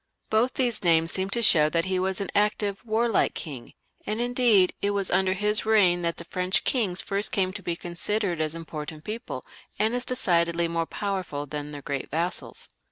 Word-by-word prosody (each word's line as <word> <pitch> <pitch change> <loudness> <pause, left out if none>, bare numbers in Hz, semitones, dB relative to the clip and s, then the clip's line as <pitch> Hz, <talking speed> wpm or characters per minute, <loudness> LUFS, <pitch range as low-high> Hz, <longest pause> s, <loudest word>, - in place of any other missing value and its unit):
Both 235 +4 +2
these 240 -5 0
names 165 -1 +3
seem 190 0 -2
to 235 +3 0
show 155 -7 +6
that 165 +1 0
he 185 -1 0
was 190 0 0
an 200 - -3
active, 205 0 0
warlike 225 -1 +1
king; 140 -7 -7 0.3
and 215 +1 -3
indeed, 240 -6 +3
it 200 - +1
was 195 -2 -1
under 185 +1 +3
his 210 +2 +1
reign 195 -5 +4
that 170 -1 -1
the 170 - -4
French 180 +1 0
kings 200 -8 0
first 200 +1 0
came 185 -2 0
to - - -7
be 170 - -2
considered 175 +1 -2
as 155 +1 -1
important 155 -1 -7
people, 225 +6 -6 0.3
and 220 +2 +1
as 245 0 -1
decidedly 170 -8 +2
more 165 0 -2
powerful 185 -8 -3
than 145 0 -6
their 145 -1 -8
great 140 -2 -4
vassals. 170 +4 -3
185 Hz, 190 wpm, -26 LUFS, 165-210 Hz, 0.3 s, show